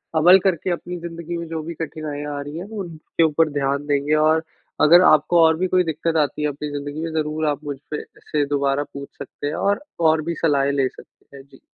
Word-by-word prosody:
अमल 175 +4 +7
करके 185 -2 0
अपनी 175 +1 -4
ज़िंदगी 170 0 -6
में 170 -1 -5
जो 160 -1 -4
भी 170 +2 -6
कठिनाइयाँ 150 -2 -5
आ - - -3
रही 145 +3 -7
हैं 180 - -5
वो 220 - -6
उनके 165 0 -2
ऊपर 160 0 +3
ध्यान 140 0 -1
देंगे 145 +1 +1
और 160 +1 +3 0.4
अगर 170 +4 +8
आपको 155 +3 +4
और 160 0 +3
भी 185 - 0
कोई 185 0 +3
दिक़्क़त 160 0 -1
आती 145 - -4
है 150 - +1
अपनी 145 +1 -5
ज़िंदगी 145 +1 -5
में 165 - -3
ज़रूर 155 +1 -3
आप 145 0 -1
मुझ 145 -2 -5
पे 150 - -2 0.2
से 150 -2 -1
दोबारा 140 0 0
पूछ 140 0 -7
सकते 145 +1 -6
हैं 145 - -2
और, 205 +7 0 0.2
और 160 -1 +3
भी 170 +2 -3
सलाहें 140 -3 +2
ले 135 -2 +1
सकते 140 - -17
हैं। 135 - -12
जी। 135 - -19
155 Hz, 230 wpm, -22 LUFS, 145-165 Hz, 0.4 s, अगर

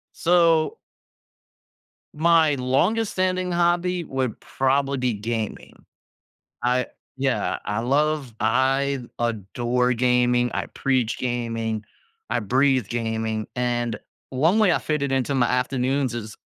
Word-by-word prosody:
So 165 -2 +3 1.4
my 160 -2 +4
longest 170 - +1
standing 185 -1 0
hobby 175 +1 +1
would 130 -5 -3
probably 135 +1 0
be 125 -2 0
gaming. 110 +1 -5 0.8
I 125 +1 +1 0.3
yeah. 135 -1 0
I 105 +2 -2
love 140 0 0
I 135 +4 +1 0.2
adore 120 +3 0
gaming, 125 0 +2
I - - -2
preach 130 -4 -1
gaming, 115 -3 -2 0.5
I - - +1
breathe 130 +2 +2
gaming, 110 -2 -2
and 120 -2 -1 0.3
1 160 +11 +2
way 195 -5 +5
I - - +2
fit 150 -2 -2
it 140 - -1
into 135 +1 0
my 125 -3 +3
afternoons 130 +1 0
is 110 -2 -6
130 Hz, 115 wpm, -23 LUFS, 120-150 Hz, 1.4 s, way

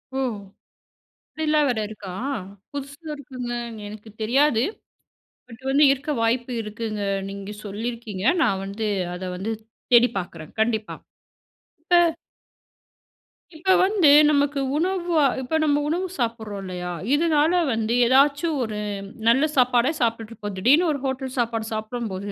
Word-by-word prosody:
ஓ! - - -1 1.2
அப்டிலாம் 305 -1 +2
வேற 235 -3 0
இருக்கா. 205 -3 -9 0.6
புதுசா 280 +3 -7
இருக்குங்க. 255 -4 -6 0.3
எனக்கு 215 +1 -10
தெரியாது. 250 +1 +3 0.9
பட் 230 0 -13
வந்து 280 +3 +4
இருக்க 275 +2 -3
வாய்ப்பு 240 +2 0
இருக்குங்க. 215 0 -5 0.3
நீங்க 200 +1 -7
சொல்லியிருக்கீங்க, 215 -1 -5 0.2
நான் 190 0 +1
வந்து 210 +2 -3 0.3
அத 180 +1 -6
வந்து 195 +5 -3 0.4
தேடி 240 +1 +7
பார்க்குறேன். 165 -4 -8
கண்டிப்பா. 220 -1 -1 0.9
இப்ப... 345 -1 +4 1.4
இப்ப 375 +4 +2
வந்து, 380 -6 +4 0.2
நமக்கு 285 -1 +2 0.2
உணவா 345 -3 +1 0.2
இப்ப 265 +5 -1
நம்ப 290 -1 +3
உணவு 365 +3 -1
சாப்பிடுறோம் 225 -4 -3
இல்லயா, 180 -1 -5 0.3
இதுனால 315 0 +3 0.2
வந்து 225 0 -1
ஏதாச்சும் 285 +5 +3
ஒரு 215 -2 -4 0.5
நல்ல 265 +6 +5
சாப்பாடே 250 +1 +3
சாப்பிட்டுட்டு 230 -1 -1
இருப்போம். 205 -3 -6
திடீர்னு 290 - +4
ஒரு 285 - -2
ஹோட்டல் 265 -1 -3
சாப்பாடு 225 -2 -1
சாப்பிடும்போது 215 -3 -4
240 Hz, 120 wpm, -24 LUFS, 215-290 Hz, 1.4 s, தேடி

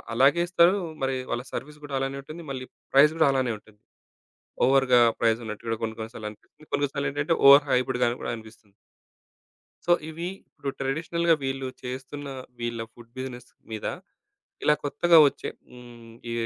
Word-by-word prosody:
అలాగే 140 +7 +5
ఇస్తారు. 175 +2 +5 0.3
మరి 135 0 0
వాళ్ళ 120 +1 -2
సర్వీస్ 150 +2 -6
కూడా 140 -2 -4
అలానే 135 +1 -2
ఉంటుంది. 160 +4 -9
మళ్ళీ 130 -1 -5 0.3
ప్రైస్ 145 +3 +7
కూడా 160 - +5
అలానే 130 -3 +1
ఉంటుంది. 105 0 -22 0.8
ఓవర్‌గా 130 -2 +5 0.2
ప్రైజ్ 115 -1 +3
ఉన్నట్టు 110 0 -7
కూడా 115 -1 -1
కొన్ని, 110 -1 -2
కొన్ని 110 +1 -6
సార్లు 105 -1 -5
అనిపిస్తుంది. 105 - -19
కొన్ని, 155 - -18
కొన్ని 145 -1 0
సార్లేంటంటే, 145 +2 0
ఓవర్ 140 +1 +9
హైప్డ్‌గా 125 -1 +2
కూడా - - -2
అనిపిస్తుంది. 110 -2 -15 1.1
సో, 175 - +5 0.2
ఇవి 165 +2 -5 0.2
ఇప్పుడు 140 - -5
ట్రెడిషనల్‌గా 165 +5 +1
వీళ్ళు 135 0 -2
చేస్తున్న, 130 +3 -6 0.3
వీళ్ళ 120 -1 -3
ఫుడ్ 120 -1 -16
బిజినెస్ 125 -1 -6 0.2
మీద 110 -1 -4 0.8
ఇలా 150 - +5
కొత్తగా 170 +4 +4
వచ్చే - - -7 0.2
హ్మ్, 120 -2 -13 0.2
ఈ - - -2
135 Hz, 155 wpm, -26 LUFS, 120-145 Hz, 1.1 s, ఓవర్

